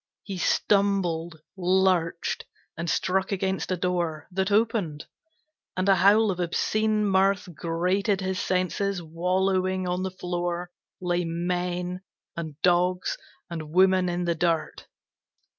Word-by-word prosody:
He 195 -3 -6
stumbled, 175 -5 +1 0.2
lurched, 185 -2 +1 0.3
and 170 +1 -3
struck 190 +4 0
against 190 -1 -1
a 185 - +1
door 170 -4 -1
That 190 +2 -1
opened, 205 -8 +1 0.7
and 185 +1 0
a 195 - +7
howl 205 +3 +5
of 180 - -5
obscene 215 +5 +1
mirth 195 0 +2
Grated 180 +6 0
his 190 -1 -2
senses, 185 0 -1
wallowing 185 +3 0
on 180 +1 -1
the 190 - -1
floor 175 -1 -3 0.3
Lay 175 0 0
men, 175 +1 -2 0.3
and 160 -3 -6
dogs 180 +1 +2 0.3
and 160 -3 -6
women 185 +2 +4
in 175 0 -1
the 170 -1 +1
dirt. 165 -1 -1
180 Hz, 125 wpm, -26 LUFS, 175-190 Hz, 0.7 s, a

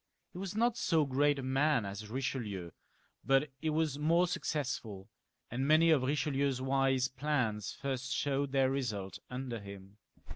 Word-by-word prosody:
He 180 - -8
was 195 0 -5
not 235 +1 +2
so 160 -8 +2
great 140 +2 +2
a 135 - -4
man 135 -2 +2
as 100 +1 -5
EicheUeu, 110 -8 -3 0.5
but 135 +2 +2
he 160 - -1
was 155 -2 0
more 165 +4 +4
successful, 125 - -3 0.4
and 130 +3 -1
many 160 +2 +6
of 150 -4 +4
Riche 140 +2 0
lieu's 140 -3 0
wise 135 -1 +2
plans 125 -7 -1
first 135 -1 -3
showed 140 -1 0
their 135 -1 +3
result 105 -8 -3
under 125 -2 -4
him. 100 0 -11
135 Hz, 155 wpm, -33 LUFS, 125-150 Hz, 0.5 s, many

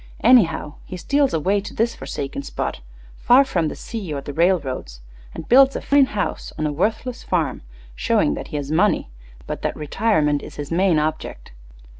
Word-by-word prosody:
Anyhow, 170 -11 +4
he 185 - -8
steals 280 +9 +1
away 195 +6 +1
to 205 - -9
this 230 +1 +1
forsaken 140 0 -5
spot, - - -4 0.4
far 255 +4 +5
from 170 -11 0
the - - -5
sea 210 -8 -6
or 145 - -2
the 140 +1 -7
railroads, 140 - 0 0.4
and - - -7
builds 270 +2 +6
a - - -1
fine 280 -1 +4
house 210 -4 -3
on 155 - -1
a 150 - 0
worthless 220 - -2
farm, 165 -7 -1 0.3
showing 60 +4 +1
that - - -6
he 150 - -5
has 145 0 -4
money, 175 - +1 0.3
but - - -5
that - - -2
retirement 150 -2 +1
is - - -10
his 145 0 -7
main 180 -1 +3
object. 155 +1 -3
170 Hz, 180 wpm, -21 LUFS, 150-225 Hz, 0.4 s, builds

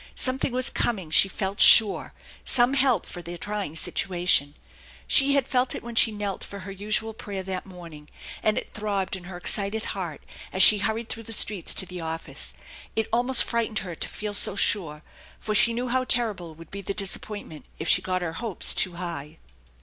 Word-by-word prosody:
Something 260 0 +1
was 255 +1 +2
coming, 190 -9 -3
she 195 - +4
felt 195 +1 -5
sure, 215 -3 +8 0.3
some 245 +1 +2
help 265 -3 +2
for 175 - -9
their 175 +1 -9
trying 205 -4 -5
situation. 175 -3 0 0.5
She 275 0 +5
had 275 -2 0
felt 250 0 0
it - - -8
when 235 0 -8
she 225 0 +3
knelt 205 -2 -5
for 200 -1 -9
her 195 +2 -9
usual 215 +3 -2
prayer 200 -3 -7
that 185 0 -6
morn 175 -3 -12
ing, 150 0 -14 0.3
and 215 - 0
it - - -6
throbbed 200 -3 -3
in 180 -2 -11
her 175 0 -9
excited 200 +4 -1
heart 175 -7 -7 0.3
as 190 - +5
she 210 - +8
hurried 220 +3 -3
through 225 - -6
the - - -4
streets 210 -4 +2
to 190 - 0
the 180 -1 -9
office. 165 0 -5 0.4
It 220 - -2
almost 245 +2 +4
frightened 230 -2 -2
her 175 - -7
to - - -6
feel 210 -1 -6
so 200 - +4
sure, 155 -7 +1 0.3
for 215 - -5
she 225 +3 +4
knew 245 +2 -4
how 255 +1 -1
terrible 200 -11 -2
would 165 +1 -15
be 200 - -6
the 200 +1 -5
disappointment 195 -4 -3
if 160 - -6
she - - +3
got 185 -1 -3
her 165 -2 -4
hopes 220 -1 +1
too 185 - 0
high. 165 -3 -7
200 Hz, 200 wpm, -24 LUFS, 175-225 Hz, 0.5 s, sure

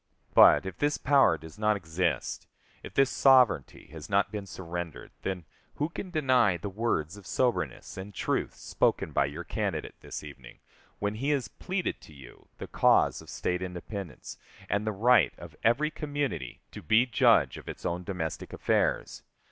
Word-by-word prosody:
But, - - +7
if 95 -2 -6
this 145 0 +1
power 135 - +4
does 80 +5 -13
not 105 -1 +2
exist, 85 -3 -2 0.3
if - - -11
this 135 -1 +4
sovereignty 125 - +4
has 80 -2 -9
not 100 0 +2
been 105 -2 -5
surrendered, 85 -3 -6
then, 90 -3 -4 0.3
who 150 +2 -1
can 185 +2 -6
deny 130 - +3
the 100 +4 -6
words 100 -5 -1
of 100 -2 -13
soberness 125 -6 -1
and 95 +2 -7
truth 100 - -2
spoken - - 0
by 70 - +2
your 75 +5 -6
candidate 95 -3 -3
this - - -7
evening, 65 -5 -12 0.4
when 100 0 -1
he 130 +7 -2
has 135 -6 0
pleaded 185 -1 -3
to 80 - -15
you 65 -4 -15
the - - -6
cause - - +3
of - - -14
State 90 0 -2
independence, 90 0 -7 0.3
and 100 +1 0
the - - +2
right 110 -2 +4
of - - -11
every 140 +7 +3
community 145 - -4
to - - -9
be 110 +9 +4
judge 120 -4 +3
of - - -11
its - - -8
own 90 +1 -2
domestic 85 -4 -4
affairs? - - 0
100 Hz, 170 wpm, -29 LUFS, 85-125 Hz, 0.4 s, But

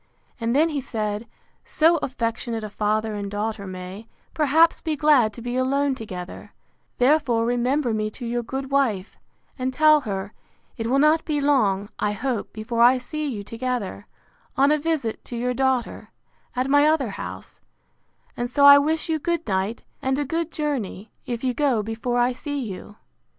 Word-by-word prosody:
And 230 +1 0
then 315 +3 +4
he 290 -3 -2
said, 215 -3 -3 0.4
So 330 +2 +3
affectionate 230 -4 -3
a 210 - -6
father 215 +1 0
and 205 -1 -4
daughter 205 0 -3
may, 185 +4 -8 0.3
perhaps, 315 +2 +3
be 315 -2 -1
glad 285 -7 +4
to 235 - -10
be 245 0 -3
alone 275 +2 +1
together; 185 -7 -8 0.4
therefore 250 -4 +3
remember 245 +2 +1
me 215 0 -1
to 245 - -6
your 240 +1 -1
good 265 +3 -5
wife, 225 -9 0 0.4
and 255 +1 -1
tell 305 +3 +5
her, 200 -3 -4 0.4
it 225 - -3
will 260 +3 +2
not 305 +3 +4
be 300 -2 -1
long, 215 -9 +2
I 210 - 0
hope, 235 +1 -3
before 225 +2 -3
I 245 +2 +7
see 305 +4 -4
you 220 -7 -4
together; 230 -3 -4 0.5
on 275 +2 +5
a 305 - +3
visit 295 -8 -2
to 240 - -6
your 250 +1 -1
daughter, 260 -1 -1 0.5
at 255 +1 0
my 290 +2 +5
other 305 -6 +2
house: - - -8 0.7
and 240 0 -3
so 280 +3 +3
I 285 0 +10
wish 310 +2 0
you 320 -1 0
good 340 +2 -2
night, 195 +3 -1 0.2
and 265 0 0
a 290 - -1
good 330 +3 -2
journey, 240 -9 -3 0.2
if 240 0 -4
you 255 -1 +1
go 260 -6 +1
before 225 +3 -2
I 245 +1 +3
see 290 +3 -5
you. 210 -3 -7
250 Hz, 175 wpm, -24 LUFS, 220-285 Hz, 0.7 s, I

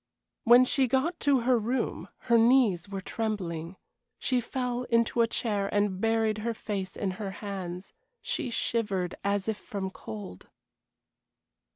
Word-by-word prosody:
When 245 +2 +8
she 265 0 +2
got 265 +8 0
to 275 -3 +3
her 245 0 +3
room 240 +5 -2
her 235 - +2
knees 225 -6 +4
were 195 -1 -4
trembling. 185 -6 -3 0.4
She 255 -1 +1
fell 250 0 -2
into 230 0 +2
a 230 - +4
chair 205 -4 -1
and 205 -2 +1
buried 225 -1 +1
her 230 +1 -2
face 195 -4 -4
in 195 -3 -1
her 200 - -2 0.2
hands. 185 -2 -5 0.3
She 255 - -3
shivered 205 -6 -1
as 200 0 0
if 220 -1 -1
from 195 -3 -5
cold. 105 - -9
215 Hz, 145 wpm, -28 LUFS, 195-240 Hz, 0.4 s, When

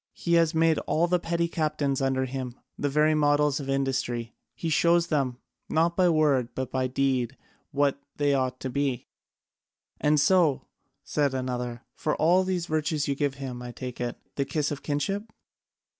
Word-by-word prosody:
He 170 - -1
has 165 -1 +4
made 160 -1 +3
all 165 +2 +2
the 180 0 +2
petty 170 0 0
captains 150 -4 -1
under 135 -1 +1
him 130 -1 -5 0.2
the 145 - -1
very 150 +2 +3
models 145 -1 +3
of 135 -1 -6
industry; 130 -4 -1 0.2
he 165 - -4
shows 170 +2 +3
them, 135 -6 0 0.3
not 165 +2 +2
by 180 -2 +4
word 145 -7 +2
but 130 -1 -3 0.2
deed, 130 -2 +1 0.3
what 140 0 +1
they 145 -1 +2
ought 130 -1 0
to 130 - -3
be." 140 -2 -1 0.9
"And 150 0 +3
so," 155 -2 +3 0.4
said 145 -3 0
another, 125 -1 -3
"for 150 - -1
all 175 +4 +4
these 185 -2 -1
virtues 155 -2 -1
you 140 - +1
give 140 -1 -1
him, 130 -3 -6
I 125 0 -6
take 125 0 -7
it, 120 -1 -3 0.2
the 140 - +2
kiss 145 +2 -1
of 145 - -4
kinship?" 195 +10 -2
145 Hz, 170 wpm, -27 LUFS, 130-160 Hz, 0.9 s, has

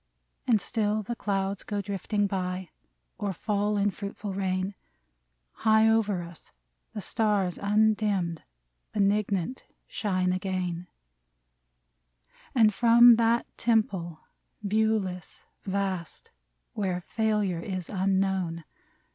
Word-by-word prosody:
/ - - -45
And 230 -4 +4
still 215 0 -1
the 235 +4 -4
clouds 195 -2 -2
go 205 -1 -3
drifting 200 +1 -1
by, 185 -2 -3 0.5
Or 200 -2 -2
fall 205 +2 -1
in 205 0 +2
fruitful 200 +1 -6
rain: 190 0 -1 0.8
High 220 0 +4
over 210 -5 +2
us 170 -1 -12 0.4
the 210 - -5
stars, 205 -4 0
undimmed, 205 -4 +1 0.5
Benignant 200 +2 0 0.2
shine 185 -3 0
again; 185 -2 -3 1.7
And 220 -4 +5
from 235 +1 +7
that 230 +1 +2
temple, 195 -8 0 0.4
viewless, 205 -3 -1 0.2
vast, 190 -4 -3 0.4
Where 185 -3 -2
failure 210 -3 0
is 185 -1 -4
unknown. 190 -3 0
200 Hz, 100 wpm, -28 LUFS, 185-215 Hz, 1.7 s, from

